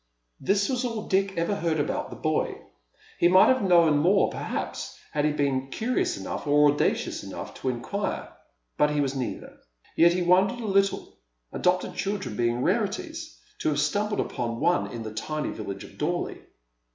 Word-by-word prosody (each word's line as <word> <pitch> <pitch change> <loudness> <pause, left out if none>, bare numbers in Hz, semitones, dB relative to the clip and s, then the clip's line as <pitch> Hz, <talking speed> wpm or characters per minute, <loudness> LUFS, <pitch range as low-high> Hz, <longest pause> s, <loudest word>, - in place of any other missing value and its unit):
This 200 0 +2
was 255 -1 -1
all 230 -3 -3
Dick 195 0 +1
ever 170 +4 +1
heard 165 -4 0
about 145 - -1
the - - -8
boy. - - -1 0.6
He 175 - +5
might 185 +2 +6
have 260 -1 +3
known 170 -6 +5
more 190 +6 +3
perhaps - - -4
had 145 0 0
he 150 - +3
been 140 -3 0
curious 320 - -1
enough - - -5
or 145 0 +5
audacious 145 - -1
enough - - -7
to 130 - 0
inquire, 130 +12 -3 0.5
but 150 - +5
he 150 0 0
was 140 -2 +1
neither. 130 -2 -5 0.4
Yet 170 +1 +6
he 180 0 0
wondered 190 +7 +3
a 230 - -5
little, 195 -1 0 0.3
adopted 180 0 +1
children 200 - -3
being 120 +2 0
rarities, 315 - -2 0.2
to - - +1
have 145 -1 0
stumbled 205 +8 0
upon 115 -1 -3
one 175 - +2
in 115 -1 -5
the 110 -1 -6
tiny 155 +7 -3
village 100 -2 -6
of - - -14
Dorley. - - -2
175 Hz, 175 wpm, -26 LUFS, 145-205 Hz, 0.6 s, might